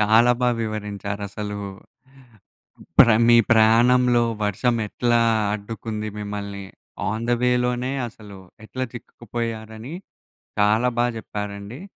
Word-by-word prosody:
చాలా 110 +3 +5
బా 125 - +3
వివరించారు. 105 -2 -4
అసలు 105 0 -5 1.4
ప్రా 115 -2 +8
మీ 120 - +7 0.2
ప్రయాణంలో 120 +2 +4 0.2
వర్షం 110 +4 +1
ఎట్లా 120 +1 +1 0.3
అడ్డుకుంది 110 +1 -5
మిమ్మల్ని. 100 -1 -5 0.4
ఆన్ 110 +2 -2
ది 120 - +4
వే 125 - +3
లోనే 125 +1 -1 0.2
అసలు 105 -3 -13 0.3
ఎట్లా 130 +3 -4
చిక్కుకుపోయారని, 115 +2 -6 0.6
చాలా 110 +4 +3
బా 120 - +3
చెప్పారండి. 105 +3 -6
110 Hz, 105 wpm, -23 LUFS, 105-120 Hz, 1.4 s, ప్రా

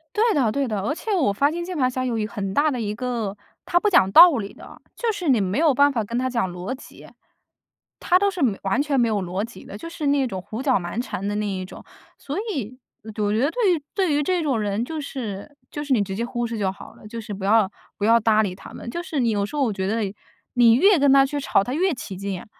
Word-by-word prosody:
对 445 +1 +3
的 255 -7 +2
对 280 +4 0
的， 215 -4 -2
而 295 +9 -1
且 430 +5 -3
我 290 - +2
发 280 +8 +2
现 345 +2 -4
键 355 -1 -5
盘 255 -2 +2
侠 255 0 -2
有 235 -2 -1
一 215 - -1
很 200 -2 -4
大 295 +4 +3
的 250 - -3
一 210 -2 -3
个 235 -4 -3 0.3
他 350 - +1
不 420 - +3
讲 190 - +4
道 335 -5 +9
理 200 -2 -5
的， - - -14
就 470 -2 0
是 395 -6 -5
你 245 -6 +4
没 190 +1 -1
有 310 -1 +4
办 285 +2 +4
法 230 -6 -1
跟 235 +3 -3
他 255 +1 0
讲 235 -7 -1
逻 180 +6 -5
辑。 270 - -13 0.9
他 360 - +3
都 400 +1 +3
是 360 - -6
没 210 -6 +1
完 195 +6 0
全 285 -3 0
没 235 - +3
有 210 -3 0
逻 185 +3 -3
辑 235 - -13
的， 200 - -8
就 335 - -8
是 315 -3 -4
那 280 -2 +2
种 190 -5 -5
胡 220 +6 -6
搅 260 -6 +3
蛮 180 +6 -3
缠 200 -6 -5
的 205 - -1
那 210 0 -1
一 185 -2 -3
种。 - - -12 0.3
所 290 +5 -6
以 270 - -4 0.3
我 - - -15 0.2
我 205 - +1
觉 215 - +1
得 280 +5 +2
对 425 -5 +2
于 305 - -5
对 375 -6 +1
于 290 - +2
这 355 +2 0
种 265 -7 0
人 205 +1 -1
就 315 +2 -5
是 240 -5 -6 0.2
就 295 - -4
是 290 - -7
你 215 - +3
直 195 -1 -5
接 230 - -2
忽 240 0 -3
视 230 0 -5
就 190 -2 0
好 195 - -12
了， - - -14
就 230 +2 -7
是 210 - -7
不 195 -1 -7
要 210 -1 +4 0.3
不 205 - -1
要 230 +1 +5
搭 220 -1 +3
理 190 - -2
他 - - -12
们。 - - -8
就 345 - -4
是 320 -5 -3
你 240 -2 +2
有 205 -1 0
时 250 - -8
候 285 - +1
我 230 -5 0
觉 190 -1 -2
得， 210 -2 -1 0.4
你 235 -2 +6
越 365 - +5
跟 280 -1 +4
他 275 0 +6
去 290 +1 -3
吵 230 -7 +2
他 245 - -4
越 360 +3 +1
起 200 -6 -7
劲， 195 -1 -4
啊。 - - -13
240 Hz, 305 characters per minute, -23 LUFS, 205-295 Hz, 0.9 s, 道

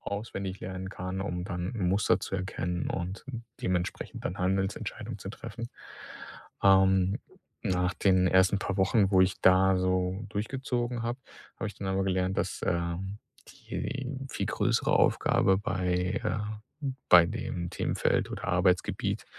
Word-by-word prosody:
auswendig 100 -2 -4
lernen 95 0 -5
kann, 90 0 -4
um 90 -2 -3
dann 90 +1 -3
Muster 95 +1 +2
zu 95 - -3
erkennen 90 -2 -2
und 95 +2 -4 0.4
dementsprechend 90 -1 -2
dann 90 - -3
Handelsentscheidungen 95 +1 -2
zu - - -6
treffen. 115 +3 -7 0.9
Ähm, 95 +1 +5 0.4
nach 90 -3 +1
den 95 -2 +3
ersten 95 +2 +4
paar 100 -1 -2
Wochen, 95 +1 +3
wo 95 -2 +5
ich 95 0 0
da 95 +1 +6
so 95 +1 0
durchgezogen 120 +2 -2
habe, 120 +2 -2 0.4
habe 110 - -2
ich 105 - -9
dann 100 - -5
aber 95 0 +1
gelernt, 95 0 0
dass, - - -2
ähm, 85 +3 -1 0.3
die 135 -1 -5 0.2
viel - - -2
größere - - +1
Aufgabe 95 - +4
bei, 90 0 -1
äh 105 +1 0 0.7
bei 85 -2 +9
dem 85 0 -4
Themenfeld - - 0
oder - - -6
Arbeitsgebiet 90 -1 +1
95 Hz, 135 wpm, -29 LUFS, 90-100 Hz, 0.9 s, bei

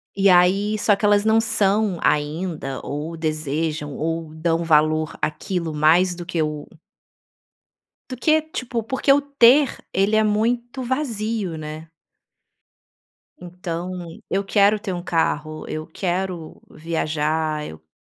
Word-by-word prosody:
E 200 0 +3
aí 190 +4 +4
só 210 0 +3
que 210 - -2
elas 205 0 +4
não 220 +1 +4
são 215 -3 +1
ainda 150 -2 -1
ou 150 +4 -5
desejam 155 -1 -2
ou 165 0 -3
dão 165 +1 0
valor 155 -1 +2
àquilo 170 0 -2
mais 165 +4 +3
do 175 0 -8
que 170 -2 -2
o 150 -1 -3 1.4
do 255 - -5
que, 310 +5 +3
tipo, 255 -6 -4
porque 265 +4 +2
o 285 - +3
ter 280 -1 +4 0.2
ele 195 +3 +2
é 220 - +4
muito 235 +4 0
vazio, 225 - -2
né. 155 +1 -8 1.5
Então, 180 0 -6 0.4
eu 195 +1 0
quero 205 +1 +3
ter 195 -3 -4
um 175 - -5
carro, 155 -2 -1
eu 155 0 -4
quero 180 -1 -4
viajar, 155 -1 -1
eu 80 0 -14
175 Hz, 130 wpm, -22 LUFS, 155-215 Hz, 1.5 s, aí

